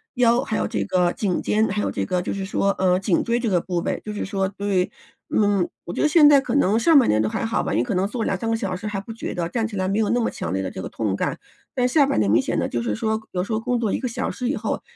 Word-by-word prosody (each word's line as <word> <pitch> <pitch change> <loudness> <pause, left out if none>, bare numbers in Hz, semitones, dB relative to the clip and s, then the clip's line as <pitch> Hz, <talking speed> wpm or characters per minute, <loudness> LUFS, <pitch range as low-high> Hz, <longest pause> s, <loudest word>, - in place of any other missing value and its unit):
腰 240 0 +4
还 220 - -2
有 - - 0
这 100 -2 -2
个 180 - +1
颈 195 -4 -1
肩， 215 +1 +1
还 205 +2 -1
有 - - -1
这 100 - -2
个 180 - -1
就 - - -3
是 195 -1 -4
说， 200 0 +1
呃， 185 -1 +2
颈 195 -2 +1
椎 235 0 0
这 235 - -2
个 180 -4 +2
部 180 -2 -3
位 - - -2
就 215 - -5
是 210 - -4
说 195 -1 -1
对， 195 -2 -1 0.4
嗯， 205 -4 +2 0.2
我 175 - -5
觉 - - -2
得 305 - +4
现 300 -1 +6
在 285 -2 +7
可 260 -1 -3
能 220 -4 +3
上 320 +4 +5
半 255 - +5
年 110 0 +3
都 110 - 0
还 - - -2
好 225 - 0
吧， - - -3
你 - - +2
可 235 - -3
能 185 +2 +1
坐 225 +1 -3
2、3 195 +4 -1
个 225 - +2
小 185 -4 -3
时 205 +3 -6
还 200 -2 -3
不 225 +3 -8
觉 225 - -5
得， 170 -1 -1
站 225 +2 -1
起 215 - -8
来 185 -1 -1
没 200 +3 0
有 215 - +1
那 245 - +2
么 230 - 0
强 85 - -5
烈 95 0 -1
的 95 - -4
这 - - -6
个 - - -6
痛 105 -4 -2
感。 - - -2 0.4
但 250 -1 +2
下 285 +2 +4
半 270 - 0
年 100 -2 +2
明 115 +5 +4
显 - - -2
地， - - 0
就 120 - -2
是 105 - -1
说 220 - 0
有 180 - -1
时 220 - -4
候 220 - +1
工 245 +1 -1
作 220 -4 0
1 - - 0
个 255 - -2
小 230 - -3
时 250 -1 -3
以 - - 0
后 - - -3
205 Hz, 340 characters per minute, -23 LUFS, 180-230 Hz, 0.4 s, 在